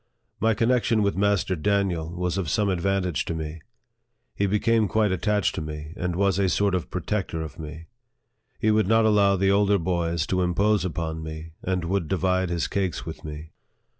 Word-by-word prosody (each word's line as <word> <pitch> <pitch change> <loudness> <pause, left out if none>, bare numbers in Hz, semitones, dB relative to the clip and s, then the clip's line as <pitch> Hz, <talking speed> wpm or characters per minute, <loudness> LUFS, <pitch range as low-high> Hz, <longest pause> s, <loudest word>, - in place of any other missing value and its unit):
My 110 +1 +2
connection 115 -1 +2
with 100 - +1
Master 100 -1 +1
Daniel 90 -2 0
was 90 0 -2
of 85 -5 -2
some 105 +7 +1
advantage 90 -2 0
to 85 - -3
me. 80 0 -5 0.7
He 100 - 0
be 105 +2 +2
came 115 0 +2
quite 105 0 +2
attached 105 0 +1
to - - -4
me, 75 0 -6
and 90 -1 -2
was 100 0 +2
a 95 -1 +2
sort 100 +1 +1
of 90 -2 -2
protector 90 -2 -2
of 80 - -9
me. 80 +1 -8 0.7
He 110 - +2
would 110 -2 +2
not 115 +1 +4
allow 100 -2 +4
the 95 +1 +2
older 100 0 +3
boys 85 -2 -1
to 90 +1 0
impose 100 +4 +2
upon 80 -2 -3
me, 80 +1 -7
and 90 -2 -1
would 90 -1 -1
divide 95 0 +1
his 85 -1 -1
cakes 95 -3 -2
with 80 - -7
me. 75 +1 -8
95 Hz, 190 wpm, -25 LUFS, 85-100 Hz, 0.7 s, not